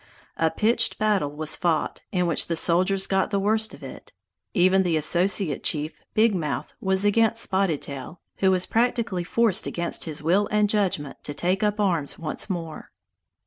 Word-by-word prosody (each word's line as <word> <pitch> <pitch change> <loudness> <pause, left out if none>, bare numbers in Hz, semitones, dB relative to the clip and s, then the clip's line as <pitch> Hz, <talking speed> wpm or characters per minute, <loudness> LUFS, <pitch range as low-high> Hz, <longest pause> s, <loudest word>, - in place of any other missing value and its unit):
A 165 - +2
pitched 225 +7 +1
battle 210 -8 +1
was 155 +1 -4
fought, 170 -3 -1
in 180 -1 +1
which 170 -3 +1
the 170 - -1
soldiers 185 +4 +2
got 190 0 +1
the 200 -2 0
worst 220 +2 +1
of 145 - -16
it. 135 - -10 0.4
Even 185 +2 +4
the 175 -4 +1
associate 175 0 0
chief, 155 0 -1 0.2
Big 220 0 +4
Mouth, 155 -6 -3
was 190 +1 +1
against 225 +2 +3
Spotted 190 -6 0
Tail, 140 +4 -8 0.2
who 190 - +3
was 185 -1 +2
practically 230 -5 0
forced 225 +2 +1
against 170 0 -2
his 155 -2 -6
will 190 +6 +2
and 210 0 +2
judgment 185 -9 -1
to 145 - -5
take 185 +4 0
up 210 0 0
arms 170 -8 0
once 165 +5 -5
more. 165 -4 -5
185 Hz, 175 wpm, -24 LUFS, 160-205 Hz, 0.4 s, Even